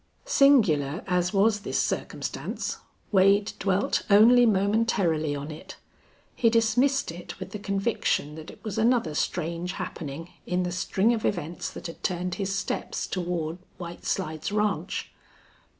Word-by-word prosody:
Singular 195 - +4
as 180 -1 +1
was 205 +1 +3
this 200 - -3
circumstance, - - -3 0.3
Wade 200 +1 +4
dwelt 195 0 +1
only 235 +4 +7
momentarily 195 -7 +1
on 145 +2 -5
it. 155 - -10 0.6
He 230 - +4
dismissed 235 +3 +2
it 175 +1 -9
with - - -7
the 210 - -5
conviction 195 -7 -1
that 155 +1 -9
it - - -14
was 215 -3 -3
another 225 -8 +2
strange 170 +3 -2
happening 165 -3 -6 0.2
in 180 0 0
the 180 - -2
string 190 +5 +1
of 225 - -2
events 170 -3 -2
that - - -10
had 165 - -7
turned 180 -1 -1
his 195 0 -1
steps - - -3
toward 175 -2 -3 0.2
White 175 -1 -8
Slides 160 -2 -2
Ranch. 210 -1 -1
190 Hz, 140 wpm, -26 LUFS, 170-215 Hz, 0.6 s, only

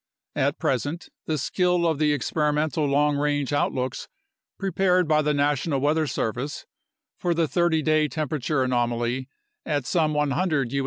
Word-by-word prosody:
At - - +1
present, 160 +5 -2 0.2
the 155 - 0
skill 180 +5 +1
of 160 -3 +1
the 150 -1 +3
experimental 150 +1 0
long 145 +1 +2
range 145 -1 0
outlooks 130 -3 -1 0.5
prepared 185 -2 +1
by 155 0 +3
the 150 0 +1
National 145 0 +1
Weather 150 +3 +1
Service 125 +3 -3 0.5
for 175 -1 0
the 165 -1 +1
30 170 -1 +1
day 155 0 +3
temperature 150 -2 -1
anomaly 120 +1 -1 0.3
at 145 -4 -1
some 155 -1 +1
100 150 -3 0
U. 140 - +1
150 Hz, 145 wpm, -25 LUFS, 140-160 Hz, 0.5 s, the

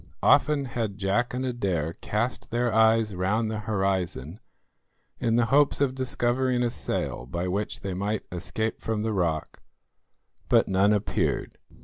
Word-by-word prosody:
Often 150 -2 +4
had 115 -5 -3
Jack 100 +5 0
and 130 +1 -2
Adair 95 -11 -1
cast 115 +4 -2
their 120 0 0
eyes 110 -1 +4
round 105 +5 0
the 110 - -3
horizon 95 - -2 0.8
in 115 -2 +1
the 120 -1 +3
hopes 145 0 +4
of 140 -2 +2
discovering 125 -1 0
a 120 - +1
sail - - -3
by 85 +6 -3
which 100 +3 -3
they 95 -2 -3
might 100 +3 -2
escape 110 +5 -3
from 110 -2 -2
the 110 0 -1
rock, 85 -5 -1 0.9
but - - +4
none 95 +2 +3
appeared. 105 -1 -1
110 Hz, 145 wpm, -26 LUFS, 95-120 Hz, 0.9 s, Often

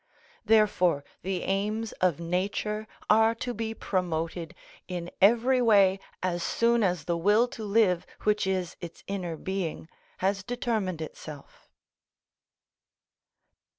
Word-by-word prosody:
Therefore 205 -9 +3 0.2
the 185 -1 -2
aims 210 +3 -1
of 180 -5 +2
Nature 200 +5 -2 0.2
are 225 +1 +5
to 245 +1 -4
be 225 0 -4
promoted 165 -4 -2 0.3
in 175 -1 -5
every 240 +5 +5
way 200 -5 +5 0.2
as 175 -1 -1
soon 235 +5 +2
as 180 -5 +1
the 175 - 0
will 205 +8 +3
to 225 - -8
live, 200 -4 +2 0.2
which 210 -2 +2
is 185 -2 -1
its 170 -1 -9
inner 180 -5 -4
being, 185 -3 -4 0.3
has 195 +1 0
determined 205 -6 -2
itself. 150 -2 -11
195 Hz, 120 wpm, -28 LUFS, 175-220 Hz, 0.3 s, are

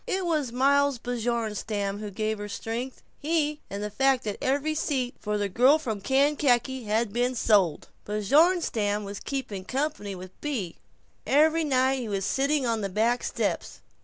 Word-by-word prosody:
It 380 -1 -1
was 305 -7 0
Miles 280 +2 +3
Bjornstam 220 -4 -2
who 210 -1 -5
gave 215 +1 -2
her 205 0 -6
strength 235 +5 -5 0.2
he 300 -1 0
and 200 +1 -5
the 210 - -4
fact 270 +3 +2
that 210 -2 -4
every 285 +4 0
seat 265 -5 -1
for 210 0 -2
"The 205 -1 0
Girl 250 +10 +5
from 225 -10 -4
Kankakee" 265 0 +2
had 215 0 0
been 245 +2 0
sold. 200 -9 +2 0.2
Bjornstam 215 - +2
was 200 0 -6
"keeping 255 -9 -4
company" 260 -4 -3
with 185 0 -9
Bea. 235 - -3 0.5
Every 315 +3 +4
night 265 -2 +2
he 235 -3 -4
was 195 -2 -1
sitting 275 +3 +1
on 230 -2 0
the 200 - -2
back 230 +5 +1
steps. - - -2
245 Hz, 160 wpm, -27 LUFS, 210-280 Hz, 0.5 s, Girl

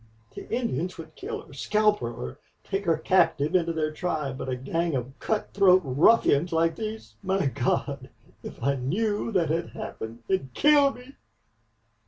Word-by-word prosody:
The - - -9
Indians 185 - -2
would 160 -1 -10
kill - - -6
her - - -16
scalp 210 +8 +2
her 120 - -3
or 65 - -7 0.2
take 195 +1 -3
her 165 -2 +3
captive 155 -3 +2
into 170 -2 +2
their 155 -1 -1
tribe... 155 -5 -2
But - - -4
a 130 - -1
gang 165 +5 -1
of 130 +1 -3
cutthroat 195 -3 +3
ruffians 145 - +4
like 165 0 +2
these... 220 +3 -6
My 190 -2 0
God! 135 0 -1 0.3
if - - -9
I 140 0 +2
KNEW 205 - -1
that 175 -5 +2
had 165 +1 -1
happened 115 +1 -7
it'd 160 -10 -1
kill 290 -2 +5
me." 250 +3 -14
165 Hz, 165 wpm, -26 LUFS, 140-200 Hz, 0.3 s, kill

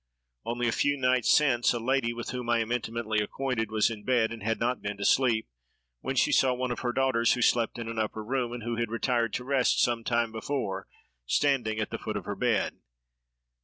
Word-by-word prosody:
Only 120 +1 -1
a - - +2
few 145 +4 +1
nights 125 -2 +2
since, 130 -6 +4
a - - -2
lady, 130 0 +1
with 120 0 -5
whom 125 -1 -5
I 120 - +4
am 115 0 -2
intimately 115 -2 -1
acquainted, 115 +1 -2
was 110 +1 +2
in 105 -2 -7
bed, 120 -2 +2
and 115 -1 -7
had 115 +2 -1
not 125 +2 -1
been 105 0 -4
to 100 - -3
sleep, 120 -4 +3 0.5
when - - -3
she - - +3
saw 130 -1 +3
one 125 0 -2
of 120 - -3
her 120 - -1
daughters, 120 -2 +2
who 125 - 0
slept 115 -1 +2
in 115 -1 -5
an 115 0 -4
upper 110 0 -2
room, 125 +1 -1
and 120 -2 -6
who 120 0 -3
had 115 -1 -1
retired 115 0 0
to 125 - -2
rest 130 -1 +2
some 120 -1 +1
time 115 -1 0
before, 110 -5 -3 0.4
standing 125 -7 +1
at 110 - -2
the - - -4
foot 110 -1 -4
of 100 - -6
her 100 - -3
bed. 115 +1 0
120 Hz, 225 wpm, -28 LUFS, 110-125 Hz, 0.5 s, since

